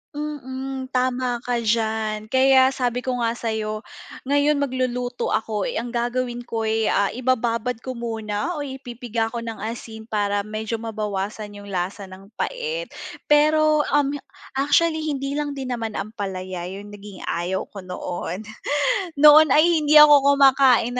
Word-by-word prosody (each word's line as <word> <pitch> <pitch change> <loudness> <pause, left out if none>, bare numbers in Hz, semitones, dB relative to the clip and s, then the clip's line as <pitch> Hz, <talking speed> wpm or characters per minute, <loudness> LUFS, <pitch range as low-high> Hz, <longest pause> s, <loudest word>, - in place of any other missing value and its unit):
Mm, 265 -3 -5
tama 255 -1 -1
ka 245 -1 -1
diyan, 220 -1 -1
kaya 265 0 +5
sabi 250 -1 -2
ko 255 -1 -2
nga 230 -1 0
sa'yo 220 -2 -3 0.4
ngayon 285 +2 +2
magluluto 255 -3 -2
ako 215 -2 -2
eh, - - -4
ang 235 +1 -3
gagawin 240 0 -2
ko'y, 225 -1 0
ah, 200 - +2
ibababad 245 -1 0
ko 260 - -4
muna 225 +4 -3
o 295 - -3
ipipiga 245 -4 -4
ko 230 +1 -5
ng 225 -1 -6
asin 220 0 -7
para 205 -2 -1
medyo 220 +1 -4
mabawasan 210 -1 -4
'yong 205 - -11
lasa 190 +2 -3
ng 190 +3 -13
pait. - - -3 0.4
Pero, 305 0 +4
um, 290 -1 +2 0.4
actually 315 +4 +2
hindi 280 -2 -2
lang 295 -1 -2
din 265 -3 -4
naman 225 -2 -4
ampalaya 190 -4 -5
'yong 200 +2 -8
naging 205 -2 -11
ayaw 175 +3 -2
ko 195 -2 -10
noon. 180 +2 -5 0.7
Noon 300 +2 +8
ay 305 - +6 0.2
hindi 300 0 +2
ako 290 -2 +8
kumakain 260 -3 +4
240 Hz, 145 wpm, -23 LUFS, 215-270 Hz, 0.7 s, Noon